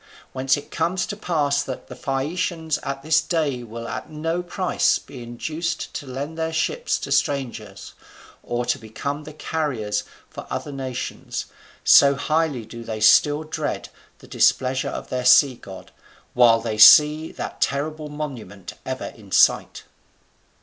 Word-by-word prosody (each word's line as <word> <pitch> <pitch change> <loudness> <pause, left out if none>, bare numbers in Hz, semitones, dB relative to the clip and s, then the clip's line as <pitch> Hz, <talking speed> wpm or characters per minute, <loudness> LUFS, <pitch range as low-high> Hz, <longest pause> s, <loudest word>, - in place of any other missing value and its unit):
Whence 135 +1 +1
it 145 - -10
comes 170 +2 0
to 210 - -5
pass 145 -8 0
that 130 -3 -6
the 125 - -10
Phaeacians 160 +4 -2
at 135 0 -5
this 160 +1 +3
day 150 -6 -1
will 115 0 -8
at - - -6
no 165 +3 -2
price 180 +1 +1
be 130 - -12
induced 155 +8 -4
to 145 - -6
lend 140 +5 -6
their 160 0 -1
ships 475 - -1
to - - -7
strangers, 115 -8 -2 0.5
or 120 0 -3
to - - 0
become 140 +7 -5
the 155 - -9
carriers 145 -10 -2 0.2
for - - -10
other 145 - -4
nations, 130 -2 -5 0.4
so 140 0 +7
highly 155 -5 -1
do 115 +1 -9
they 110 -1 -5
still 145 +7 +5
dread 155 - -4 0.3
the - - -16
displeasure 130 0 +2
of - - -7
their 125 0 -2
sea 130 +2 +6
god, 95 -5 -12 0.4
while 120 -2 +5
they 110 -2 -4
see 150 +7 +8
that - - -7
terrible 150 +2 -1
monument 125 -11 -7
ever - - -4
in - - -16
sight. - - +3
140 Hz, 150 wpm, -23 LUFS, 125-155 Hz, 0.5 s, see